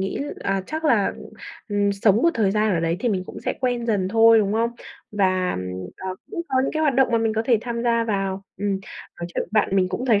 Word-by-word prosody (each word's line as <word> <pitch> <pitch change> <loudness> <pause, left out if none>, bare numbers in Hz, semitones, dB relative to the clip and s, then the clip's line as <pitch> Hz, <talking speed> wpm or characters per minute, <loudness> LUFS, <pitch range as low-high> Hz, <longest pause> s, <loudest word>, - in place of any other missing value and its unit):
nghĩ, 195 +6 -2 0.2
à, 195 -1 0
chắc 315 +1 -4
là, 225 -9 +3 0.6
ừm, 205 -1 +1
sống 200 0 +3
một 335 - +5
thời 215 -5 +2
gian 215 +1 +1
ở 165 - 0
đấy 165 +1 0
thì 245 - +1
mình 190 -4 0
cũng - - -9
sẽ - - -1
quen 245 -2 -1
dần 195 -4 +1
thôi, 225 +1 +6
đúng 205 -1 +1
không? 230 +2 +1 0.4
Và, 185 - +1 0.4
ờ, 190 0 -5 0.2
cũng 365 -5 -3
có 260 - +2
những - - -1
cái 310 - -1
hoạt 290 -4 +2
động 265 0 +4
mà 230 - +4
mình 225 -1 +1
có 220 - +1
thể 230 -2 +3
tham 235 0 -4
gia 230 -1 +2
vào. 195 -3 -2
Ừm, 205 +1 -1 0.5
nói 170 - -3
chuyện - - 0
với 215 - +5
bạn 195 - -2
mình 185 -1 +3
cũng 255 +7 -3
thấy 215 -4 +4
215 Hz, 255 wpm, -23 LUFS, 195-235 Hz, 0.6 s, thôi